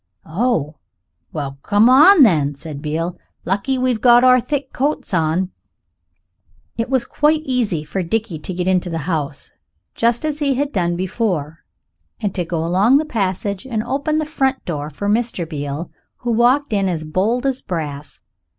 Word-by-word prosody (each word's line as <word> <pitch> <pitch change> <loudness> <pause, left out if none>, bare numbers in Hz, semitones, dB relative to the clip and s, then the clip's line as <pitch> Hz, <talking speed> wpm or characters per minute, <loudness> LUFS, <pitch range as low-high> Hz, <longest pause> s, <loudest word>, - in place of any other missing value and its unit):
"Oh, 165 - -1 0.5
well 140 -3 -5
come 205 +6 +3
on, 300 +7 +8
then," 150 - +3
said 145 0 -8
Beale; 165 +4 -3 0.3
"lucky 205 +8 0
we've 250 -3 0
got 240 0 +6
our 255 0 +6
thick 265 +2 -3
coats 280 -5 -2
on." 170 +2 +1 1.2
It 230 +1 -2
was 260 -3 +1
quite 305 +1 +1
easy 235 - -1
for 155 +6 -3
Dickie 185 -1 -2
to 170 - -6
get 180 0 -2
into 185 -1 +1
the 165 - -3
house, 150 -5 -3 0.4
just 235 +4 +1
as 305 -1 -2
he 280 -3 +1
had 285 +2 -1
done 175 -5 0
before, 180 -5 -2 0.6
and 205 -3 -2
to 180 - -1
go 165 -1 -3
along 195 +10 +4
the 310 - 0
passage 200 - -2
and 220 -4 -2
open 275 +5 -1
the 310 - 0
front 270 -3 -1
door 150 -3 -4
for 180 +7 -5
Mr. 215 -5 0
Beale, 145 +1 -5 0.3
who 240 - -3
walked 245 +3 +2
in 195 -2 +1
as 165 -3 -2
bold 200 - 0
as 265 -1 0
brass. 145 - -6
200 Hz, 170 wpm, -19 LUFS, 165-255 Hz, 1.2 s, on